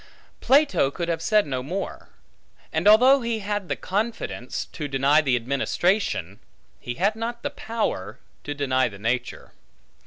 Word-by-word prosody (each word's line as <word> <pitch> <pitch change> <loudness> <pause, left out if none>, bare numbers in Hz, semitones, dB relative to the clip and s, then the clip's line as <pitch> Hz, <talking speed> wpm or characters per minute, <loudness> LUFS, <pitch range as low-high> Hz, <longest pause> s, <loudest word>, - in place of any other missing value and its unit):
Plato 280 - +3
could 170 +4 -4
have 165 -1 -1
said 210 +4 +3
no 130 -3 -3
more. 180 +9 -5 0.6
And - - +1
although 255 +6 +7
he 235 -1 -1
had 205 -2 -3
the - - 0
confidence, 200 - -3
to 150 - -5
deny 140 +3 +3
the 135 -5 +1
administration, 135 - 0 0.4
he 120 - -5
had 200 - +1
not 235 +1 -5
the - - -2
power, 225 - -3 0.3
to 145 - -5
deny 130 -3 +1
the 100 - -11
nature. 120 +4 -3
170 Hz, 150 wpm, -24 LUFS, 130-215 Hz, 0.6 s, although